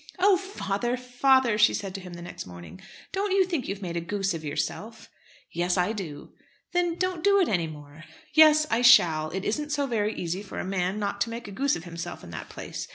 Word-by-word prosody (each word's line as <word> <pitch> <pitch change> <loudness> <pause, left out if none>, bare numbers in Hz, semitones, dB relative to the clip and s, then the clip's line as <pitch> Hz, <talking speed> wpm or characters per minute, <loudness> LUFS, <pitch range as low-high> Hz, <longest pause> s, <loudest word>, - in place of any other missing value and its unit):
"Oh! 385 +1 +5
father, 245 - -2
father," 250 -2 +2
she 215 - +5
said 195 -2 -4
to 195 - -6
him 180 -1 -10
the 170 - -9
next 175 - -8
morning, 85 0 -11 0.3
"don't 395 0 -1
you 385 -1 +4
think 335 -8 -3
you've 195 +1 -5
made 170 -2 -4
a 170 - -1
goose 195 +2 -1
of 160 -1 -6
yourself?" 205 +9 -4 0.4
"Yes, 175 +2 0
I 180 +4 +2
do." 160 -9 -7 0.4
"Then, 350 -1 +1
don't 365 -2 -2
do 400 0 +5
it 365 - +3
any 175 -5 0
more." 150 +1 -11 0.3
"Yes, 310 0 +7
I 230 - +2
shall. 165 -11 +6
It 190 +4 -4
isn't 295 +8 -1
so 290 -1 0
very 220 -4 -1
easy 175 +3 -3
for 205 - -9
a - - -3
man 185 +1 -1
not 200 -1 -3
to 230 - +1
make 235 0 -6
a - - -8
goose 275 +7 +1
of - - -7
himself 170 0 -7
in 85 - -10
that 80 - -7
place. - - -7
205 Hz, 225 wpm, -26 LUFS, 175-275 Hz, 0.4 s, Yes